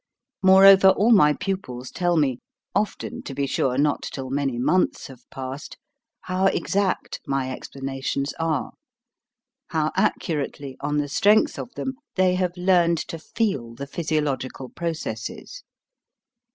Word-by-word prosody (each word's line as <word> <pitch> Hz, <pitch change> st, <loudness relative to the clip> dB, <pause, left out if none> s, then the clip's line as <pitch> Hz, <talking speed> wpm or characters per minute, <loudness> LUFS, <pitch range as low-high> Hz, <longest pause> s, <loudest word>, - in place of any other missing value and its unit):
Moreover, 190 Hz, 0 st, +8 dB
all 200 Hz, +5 st, +4 dB
my 150 Hz, -9 st, +6 dB
pupils 130 Hz, -10 st, -4 dB
tell 175 Hz, -2 st, +1 dB
me 135 Hz, -5 st, +1 dB, 0.3 s
often, 210 Hz, -, -2 dB
to 135 Hz, -, -8 dB
be 140 Hz, -, 0 dB
sure, 130 Hz, -1 st, 0 dB
not 145 Hz, +1 st, +2 dB
till 130 Hz, -1 st, -6 dB
many 135 Hz, -3 st, -1 dB
months 150 Hz, +9 st, +1 dB
have 130 Hz, -3 st, -13 dB
passed 135 Hz, +2 st, -7 dB, 0.4 s
how 185 Hz, +1 st, +1 dB
exact 195 Hz, -1 st, -1 dB
my 135 Hz, -1 st, -1 dB
explanations 135 Hz, +1 st, -4 dB
are; 165 Hz, +10 st, -1 dB, 1.0 s
how 155 Hz, -2 st, 0 dB
accurately, 150 Hz, -8 st, -1 dB
on 145 Hz, +1 st, -1 dB
the 145 Hz, -1 st, 0 dB
strength 205 Hz, +9 st, +3 dB
of 240 Hz, -, -6 dB
them, 265 Hz, -, -3 dB, 0.2 s
they 185 Hz, -1 st, +3 dB
have 180 Hz, -1 st, -1 dB
learned 175 Hz, -2 st, +3 dB
to 165 Hz, -, -5 dB
feel 150 Hz, -, -2 dB
the 140 Hz, -, -6 dB
physiological 140 Hz, -4 st, -2 dB
processes. 165 Hz, -, -5 dB
155 Hz, 130 wpm, -24 LUFS, 135-185 Hz, 1.0 s, Moreover